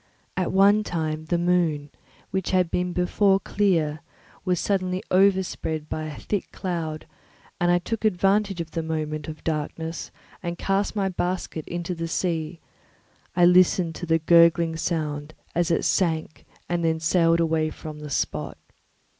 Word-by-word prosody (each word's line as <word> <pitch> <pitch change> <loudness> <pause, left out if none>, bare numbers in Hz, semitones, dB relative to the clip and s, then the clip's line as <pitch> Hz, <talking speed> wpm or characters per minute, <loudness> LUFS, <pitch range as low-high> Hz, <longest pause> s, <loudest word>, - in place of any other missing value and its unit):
At 185 -2 0
one 200 +2 +5
time 155 -4 -3
the 170 +2 0
moon, 170 -5 +1 0.4
which 190 -1 -1
had 185 -3 +2
before 180 +2 +2
been - - -14
clear, 165 -7 +2 0.4
was 180 -2 +1
suddenly 185 -2 -1
overspread 185 -5 +1
by 155 - -3
a 155 -1 -7
thick 205 -3 -3
cloud, 165 -4 -4 0.5
and 175 - +2
I 175 - +5
took 210 +5 -4
advantage 200 -1 +2
of 165 -1 -7
the 165 - -2
moment 155 -1 -3
of 155 -1 -8
darkness 160 +1 -3 0.3
and 170 0 -4
cast 195 +3 0
my 200 -2 +1
basket 180 -3 -3
into 175 +1 -3
the 165 -1 -4
sea; 165 -1 -2 0.8
I 175 -1 +5
listened 180 -1 +4
to 175 - -6
the 165 0 +4
gurgling 170 0 +5
sound 155 -2 -3 0.2
as 175 +1 +1
it 165 - +1
sank 160 -4 0 0.2
and 175 -1 -1
then 160 -1 +1
sailed 165 +1 +3
away 160 -1 +1
from 155 -1 -8
the 150 0 -7
spot. - - -2
170 Hz, 155 wpm, -25 LUFS, 160-185 Hz, 0.8 s, one